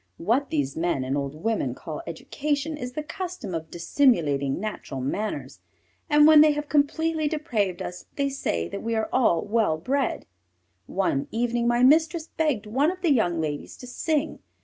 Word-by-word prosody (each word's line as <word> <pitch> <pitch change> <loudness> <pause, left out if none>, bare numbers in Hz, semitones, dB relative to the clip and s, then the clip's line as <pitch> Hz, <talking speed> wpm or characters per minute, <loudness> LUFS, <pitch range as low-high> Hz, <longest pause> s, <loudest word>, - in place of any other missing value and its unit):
What 240 +10 +1
these 140 -3 -1
men 165 -5 0
and 130 +2 -1
old 140 0 -3
women 160 - -1
call 155 +1 -7
education 290 - -2
is 250 -4 -6
the 305 - -4
custom 330 - -6
of 160 -1 -4
dissimulating 170 - +1
natural 210 -9 -5
manners, 200 +12 -3 0.5
and 295 -1 +6
when 310 -1 +9
they 305 -1 +6
have 295 0 -4
completely 310 +2 +1
depraved 235 - -1
us 180 0 -7
they 280 -1 +1
say 85 - -2
that - - -5
we 230 0 -2
are 220 0 -1 0.3
well 210 -6 +1
bred. 265 - -1 0.6
One 185 -8 0
evening 235 +1 0
my 240 +1 +3
mistress 320 +4 +4
begged 295 -10 0
one 265 +9 +2
of 370 0 -5
the 325 -5 +4
young 175 -9 +1
ladies 150 -2 -4
to - - -10
sing. 300 +4 -1
235 Hz, 170 wpm, -25 LUFS, -, 0.6 s, when